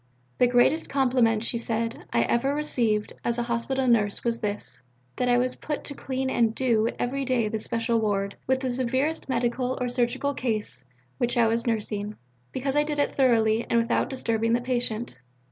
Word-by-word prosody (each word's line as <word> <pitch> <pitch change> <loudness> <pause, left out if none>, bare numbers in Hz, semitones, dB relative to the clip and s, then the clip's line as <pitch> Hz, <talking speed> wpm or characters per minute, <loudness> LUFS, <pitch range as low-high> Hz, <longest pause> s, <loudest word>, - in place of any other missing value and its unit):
"The 250 - +6
greatest 245 +6 +3
compliment," 245 -5 +2
she 235 0 0
said, 230 0 -3
"I 120 - +3
ever 270 - +1
received 235 -8 0
as 235 0 0
a 240 - 0
Hospital 240 +3 -1
nurse 210 -4 +2
was 235 -1 -1
this: 205 -8 -4 0.4
that 250 - +1
I 245 - +4
was 250 +1 +1
put 300 -1 -4
to 285 - -6
clean 265 -1 -3
and 230 -3 +1
'do' 230 -4 +2
every 275 +3 -1
day 250 -4 +1
the 220 - -2
Special 230 +1 0
Ward, 200 -2 -1
with 260 0 +2
the 260 -2 -1
severest 260 +5 -1
medical 250 +1 0
or 250 - -1
surgical 245 +3 0
case 215 - -3 0.4
which 240 0 +1
I 235 - +5
was 230 +2 0
nursing, 210 -2 -2 0.4
because 270 +1 -2
I 295 - +5
did 295 0 -3
it 285 - 0
thoroughly 230 -4 +3
and 235 - +3
without 230 0 +1
disturbing 230 -3 0
the 240 - +2
patient. 240 - -2
240 Hz, 185 wpm, -26 LUFS, 225-260 Hz, 0.4 s, The